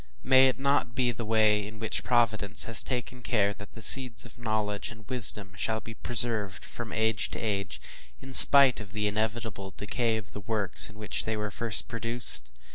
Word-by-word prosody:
may 130 +1 +4
it 130 - -3
not 140 -3 -2
be 125 -1 -1
the 115 0 -8
way 110 -1 0
in 110 +2 -11
which 110 0 -4
Providence 110 -5 +1
has 115 - +2
taken 125 -1 -6
care 105 -4 -1
that 105 0 -15
the 115 - -12
seeds 125 -2 +6
of 120 0 -16
knowledge 110 -3 -4
and 110 -2 -16
wisdom 105 -6 +2
shall 110 +3 -3
be 115 - -12
preserved 115 -4 -4
from 120 -2 -10
age 110 0 -2
to - - -7
age, 100 -3 -5 0.4
in 135 0 -13
spite 140 -2 +9
of 100 -2 -13
the 105 0 -4
inevitable 110 -2 -5
decay 115 +2 -3
of 105 -2 -11
the 105 - -10
works 105 -2 +2
in 105 - -17
which 105 0 -5
they 110 0 -4
were 105 -1 -6
first 115 -1 -3
produced? 115 - 0
110 Hz, 195 wpm, -26 LUFS, 105-120 Hz, 0.4 s, spite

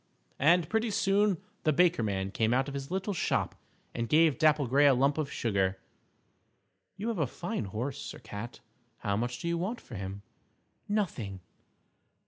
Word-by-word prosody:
And 165 +3 +4
pretty 225 +4 0
soon 200 -1 +2 0.2
the 155 - +3
Baker 170 -2 +3
Man 95 -3 -1
came 110 +3 +2
out 135 +1 +1
of 140 - -5
his 140 0 -5
little 190 +3 -1
shop 175 - 0 0.4
and 115 -1 -3
gave 160 -2 +4
Dapple 155 -2 +4
Gray 140 +4 +5
a 135 - +6
lump 140 +4 +2
of 150 -3 -2
sugar. 95 -4 0 1.2
"You 215 +4 -2
have 225 -6 -2
a 150 - +2
fine 115 - -4
horse, 115 +8 -4
Sir - - -7
Cat. 115 0 -8 0.4
How 100 -3 0
much 120 +3 -2
do 170 - -5
you 170 0 0
want 210 +8 -2
for - - -14
him?" 100 0 -5 0.7
"Nothing." 125 - -2
140 Hz, 170 wpm, -30 LUFS, 110-175 Hz, 1.2 s, a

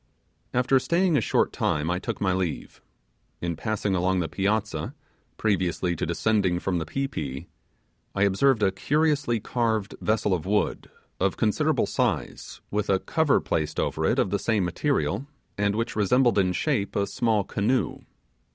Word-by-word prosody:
After 125 +2 +3
staying 170 +4 +2
a - - +3
short - - +1
time 75 +3 0
I 90 - 0
took - - -4
my 95 -2 +1
leave. 90 -3 -3 0.6
In 85 -1 -2
passing 105 +2 -2
along 95 +1 +1
the 85 - -1
piazza, 110 - -1 0.4
previously 90 -4 0
to 80 - -3
descending 95 +1 +1
from 90 0 -1
the 80 - -4
pi 135 - -1
pi, 70 - -5 0.7
I 95 - +2
observed 105 +4 +3
a 95 - +4
curiously 145 +2 +1
carved 110 -2 -1
vessel 105 -2 +1
of 90 -1 -2
wood, 105 +1 0 0.3
of - - +1
considerable - - +2
size, - - -2
with 105 0 -1
a 95 - +4
cover 155 +8 +2
placed 75 -1 -2
over - - -1
it, - - +2
of - - +1
the 100 - +1
same 105 -4 +1
material, 140 - -1 0.3
and 100 0 0
which 115 +2 -2
resembled 120 +3 +3
in 90 -1 +2
shape 100 +2 -1
a 100 - +2
small 110 -1 +1
canoe. 110 +7 0
100 Hz, 160 wpm, -26 LUFS, 90-120 Hz, 0.7 s, a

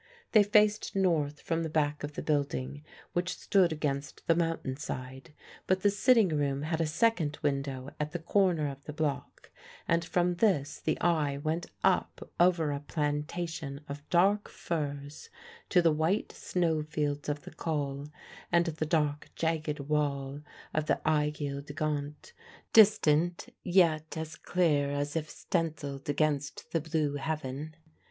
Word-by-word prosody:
They 215 - +7
faced 210 0 +3
north 160 -6 +1
from 165 0 -1
the 165 - -2
back 150 -1 0
of 145 +1 -4
the - - -5
building, 145 -1 -1 0.3
which 180 +1 -1
stood 185 -4 +3
against 145 -2 -3
the 165 - +5
mountain 165 -5 -1
side; 130 0 -7 0.4
but 185 0 +2
the 205 - +5
sitting 225 -1 +4
room 145 -2 0
had 160 +1 -1
a 160 - +1
second 160 -4 +1
window 135 -1 -2
at 150 0 -2
the 175 - -2
corner 170 -2 +2
of 140 0 -7
the 150 - -6
block, 150 -2 -3 0.4
and 170 0 +2
from 175 0 +1
this 170 -9 +1
the 155 - -1
eye 155 -5 +2
went 160 +4 -2 0.2
up - - +1
over 170 -4 +4
a 140 - -2
plantation 150 0 -3
of 145 +1 -8
dark 195 +4 +3
firs 145 -2 -4 0.4
to 180 - +4
the 165 -2 +5
white 160 +7 0
snowfields 155 -4 -1
of 145 0 -3
the - - -10
Col 145 -3 -3 0.4
and 170 0 +4
the 155 -2 -2
dark 150 -2 0
jagged 155 -2 -1
wall 140 -1 -1 0.3
of 155 0 0
the - - +2
Aiguille 150 -2 0
du 145 0 -9
Geant 150 - -3 0.4
distant, 175 -6 +5
yet 165 -4 +2
as 160 -1 -5
clear 155 -6 +1
as 145 +1 -2
if 155 -1 -2
stencilled 145 -5 -3
against 145 -1 -1
the 165 - +1
blue 155 -2 -1
heaven. 150 0 -4
155 Hz, 150 wpm, -30 LUFS, 145-170 Hz, 0.4 s, They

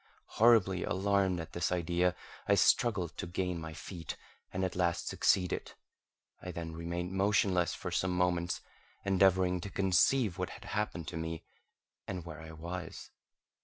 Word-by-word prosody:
Horribly 105 -6 +5
alarmed 95 -2 +1
at 80 -1 -7
this 85 - -1
idea, 90 0 +1 0.3
I - - +5
struggled 95 -9 +3
to - - -3
gain 90 -1 -2
my 80 0 -6
feet, 85 0 -7 0.3
and 95 +1 -1
at 95 - -3
last 85 -1 0
succeeded. 90 -2 +1 0.7
I 90 - -6
then 85 -1 -5
remained 85 +2 -4
motionless 95 -2 +2
for 90 - -5
some 95 +2 +1
moments, 90 -1 0 0.4
endeavouring 95 -2 +3
to 100 - -5
conceive 95 +2 +2
what 90 - -1
had - - -10
happened 105 -6 -2
to - - -5
me, 80 0 -4 0.6
and 90 -3 -4
where 80 -2 -8
I 80 - -9
was. 85 +3 -7
90 Hz, 150 wpm, -32 LUFS, 85-95 Hz, 0.7 s, Horribly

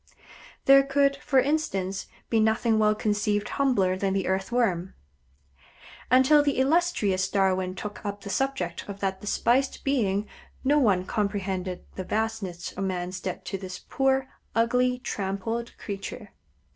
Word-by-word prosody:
There 275 0 +8
could, 275 0 +2
for 270 -1 +2
instance, 195 -10 -1 0.2
be 225 - +2
nothing 220 +1 +2
well 215 0 +4
conceived 210 -1 0
humbler 245 -10 +2
than 190 0 -1
the 195 - 0
Earthworm. 190 -1 0 1.1
Until 260 +4 +6
the 290 -1 0
illustrious 260 - +2
Darwin 190 -2 +1
took 205 +2 -7
up 205 -1 -4
the 200 - -6
subject 270 +3 -2
of 200 0 -6
that 190 -1 -2
despised 245 +5 +1
being 210 -7 +1 0.4
no 290 +3 +4
one 195 -8 +3
comprehended 195 -3 -2
the 190 - -3
vastness 210 -4 -3
of 195 - -5
man's 185 0 -3
debt 185 -2 -5
to 195 - -4
this 185 -1 -6
poor, 270 0 0 0.3
ugly, 250 +2 +2
trampled 225 +1 -3
creature. 200 0 -7
210 Hz, 135 wpm, -26 LUFS, 190-260 Hz, 1.1 s, There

